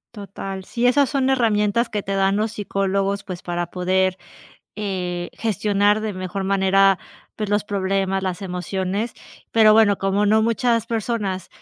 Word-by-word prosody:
Total. 195 Hz, -2 st, -7 dB
Sí, 235 Hz, +4 st, -2 dB
esas 275 Hz, +2 st, +3 dB
son 270 Hz, -2 st, +1 dB
herramientas 230 Hz, -2 st, +2 dB
que 210 Hz, -3 st, -3 dB
te 195 Hz, -, -3 dB
dan 195 Hz, 0 st, +2 dB
los 215 Hz, +1 st, 0 dB
psicólogos, 195 Hz, -1 st, -1 dB
pues 180 Hz, -2 st, -7 dB
para 175 Hz, -1 st, -3 dB
poder, 185 Hz, +1 st, 0 dB, 0.6 s
eh, 180 Hz, -4 st, -3 dB
gestionar 205 Hz, -1 st, +1 dB
de 215 Hz, -1 st, -3 dB
mejor 185 Hz, +1 st, -4 dB
manera, 195 Hz, 0 st, +3 dB, 0.4 s
pues 215 Hz, -2 st, -3 dB
los 205 Hz, 0 st, +1 dB
problemas, 195 Hz, -1 st, -1 dB
las 185 Hz, +1 st, -3 dB
emociones, 190 Hz, +4 st, -3 dB, 0.4 s
pero 220 Hz, -1 st, +6 dB
bueno, 215 Hz, -2 st, +4 dB
como 195 Hz, +2 st, +1 dB
no 220 Hz, +1 st, +4 dB
muchas 230 Hz, 0 st, +1 dB
personas, 210 Hz, -5 st, -2 dB
200 Hz, 150 wpm, -22 LUFS, 190-215 Hz, 0.6 s, pero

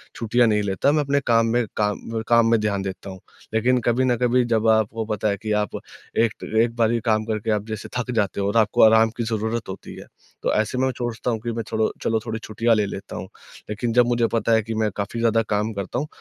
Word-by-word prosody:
छुट्टियाँ 120 Hz, +1 st, +2 dB
नहीं 105 Hz, -1 st, +2 dB
लेता 100 Hz, +8 st, +1 dB
मैं 150 Hz, 0 st, +2 dB
अपने 140 Hz, 0 st, +1 dB
काम 115 Hz, -1 st, +4 dB
में 120 Hz, -1 st, +2 dB
काम 105 Hz, +2 st, -2 dB
काम 115 Hz, -1 st, +4 dB
में 115 Hz, -, +4 dB
ध्यान 105 Hz, -2 st, -1 dB
देता 95 Hz, 0 st, -6 dB
हूँ। 95 Hz, -1 st, -9 dB, 0.3 s
लेकिन 125 Hz, +3 st, +2 dB
कभी 120 Hz, +2 st, +1 dB
न 125 Hz, -1 st, +2 dB
कभी 125 Hz, 0 st, +3 dB
जब 115 Hz, -1 st, +1 dB
आपको 110 Hz, 0 st, +1 dB
पता 105 Hz, -1 st, -2 dB
है 100 Hz, -, -1 dB
कि 110 Hz, -, -3 dB
आप 105 Hz, -2 st, -3 dB, 0.4 s
एक 115 Hz, -1 st, +1 dB, 0.2 s
एक 115 Hz, 0 st, 0 dB
बारी 115 Hz, 0 st, +2 dB
काम 110 Hz, -1 st, +2 dB
करके 110 Hz, 0 st, -2 dB
आप 105 Hz, -1 st, 0 dB
जैसे 110 Hz, -2 st, -6 dB
थक 125 Hz, 0 st, -2 dB
जाते 100 Hz, -3 st, 0 dB
हो 100 Hz, -, 0 dB
और 100 Hz, +3 st, 0 dB
आपको 110 Hz, -2 st, +3 dB
आराम 110 Hz, 0 st, +6 dB
की 120 Hz, -, -1 dB
ज़रूरत 110 Hz, 0 st, -2 dB
होती 95 Hz, -, -8 dB
है, -, -, -10 dB, 0.4 s
तो -, -, +1 dB
ऐसे 110 Hz, +3 st, 0 dB
में 130 Hz, -, +2 dB
मैं 130 Hz, -, +1 dB
सोचता 120 Hz, 0 st, -2 dB
हूँ 115 Hz, -, -2 dB
कि 120 Hz, -, -2 dB
मैं 115 Hz, 0 st, -3 dB
चलो 110 Hz, 0 st, +1 dB
चलो 110 Hz, 0 st, +1 dB
थोड़ी 110 Hz, -1 st, -4 dB
छुट्टियाँ 115 Hz, +2 st, +1 dB
ले 105 Hz, -1 st, +1 dB
लेता 100 Hz, 0 st, -7 dB
हूँ। -, -, -6 dB, 0.4 s
लेकिन 115 Hz, +2 st, -2 dB
जब 120 Hz, 0 st, +4 dB
मुझे 120 Hz, -1 st, +2 dB
पता 115 Hz, 0 st, +1 dB
है 110 Hz, -, +4 dB
कि 115 Hz, +2 st, -5 dB
मैं 105 Hz, -, 0 dB
काफ़ी 105 Hz, +3 st, -4 dB
ज़्यादा 115 Hz, -1 st, +3 dB
काम 105 Hz, +1 st, 0 dB
करता 100 Hz, +4 st, -3 dB
हूँ, 150 Hz, -, -3 dB
110 Hz, 250 wpm, -23 LUFS, 105-120 Hz, 0.4 s, आराम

